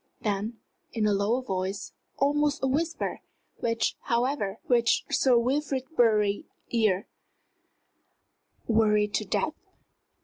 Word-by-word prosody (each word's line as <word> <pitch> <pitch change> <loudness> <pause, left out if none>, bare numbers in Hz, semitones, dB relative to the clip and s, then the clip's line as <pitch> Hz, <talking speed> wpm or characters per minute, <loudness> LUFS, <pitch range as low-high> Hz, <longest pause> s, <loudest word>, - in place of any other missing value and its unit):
then, 210 +2 -2 0.4
in 225 -3 0
a 210 - +3
lower 210 +6 +1
voice, 190 -2 -3 0.2
almost 290 +1 +1
a - - +3
whisper, 320 +5 -1 0.4
which, 230 -1 0
however, 235 -4 0
reached 235 -2 +2
Sir 255 -3 +4
Wilfrid 265 +2 0
Bury's 210 -4 +3 0.3
ears 215 -5 +2 1.6
"worried 210 -2 +3
to - - 0
death?" - - 0
230 Hz, 105 wpm, -27 LUFS, 210-260 Hz, 1.6 s, Sir